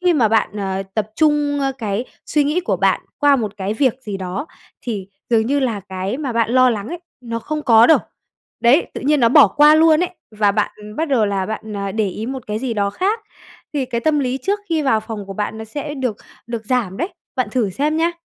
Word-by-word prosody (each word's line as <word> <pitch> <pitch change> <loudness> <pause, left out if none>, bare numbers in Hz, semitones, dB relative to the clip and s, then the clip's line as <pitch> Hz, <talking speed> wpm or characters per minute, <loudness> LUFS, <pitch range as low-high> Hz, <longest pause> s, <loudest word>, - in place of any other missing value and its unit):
khi 360 -1 +3
mà 240 -8 +3
bạn, 225 +1 +2
ờ, 195 -1 -2
tập 215 -1 -1
trung 295 -2 +2 0.2
cái 215 +1 -2 0.2
suy 300 -1 +2
nghĩ 300 +5 +1
của - - -1
bạn - - +2 0.2
qua 285 -2 +5
một 215 -5 -2
cái 200 +2 -2
việc 255 -1 +2
gì 205 -4 -4
đó, 190 - -4 0.3
thì 205 -6 -5 0.2
dường 225 -1 +3
như 280 +2 +1
là 230 -6 -1
cái 190 +4 -4
mà 275 -5 -3
bạn 230 -1 +1
lo 255 0 +5
lắng 210 -1 -3
ấy, 345 +3 -5 0.2
nó 230 -1 -4
không 300 +5 -4
có 230 -3 +6
đâu. 320 - +6 0.6
Đấy, 245 +8 +4
tự - - -5
nhiên 290 +1 +2
nó 230 - +5
bỏ - - +8
qua 300 +1 +6
luôn 315 0 +5
ấy, 360 - 0 0.2
và 210 -2 +2
bạn 210 0 -3
bắt 320 0 -1
đầu 235 -6 +3
là 195 -2 -1
bạn, 220 0 -5
ờ, 200 -1 -3
để 215 -3 0
ý 215 +4 -5
một 260 -1 -5
cái 210 0 -2
gì 240 -2 -3
đó 200 -1 0
khác 400 - -1 0.5
thì 280 -3 0
cái 240 -2 -3
tâm 300 +3 +2
lý 260 -1 -1
trước 405 +1 0
khi 320 -2 +1
vào 265 -6 +2
phòng 215 -2 -7
của 195 - -6
bạn 210 +2 -3
nó 220 - -6
sẽ 290 +6 -5
được 255 -7 -2 0.3
được 230 -2 -5
giảm 230 -7 0
đấy. 345 - -2 0.3
Bạn 250 -5 0
thử 220 -5 0
xem 300 - 0
nha. 335 +1 +2
235 Hz, 240 wpm, -19 LUFS, 210-290 Hz, 0.6 s, bỏ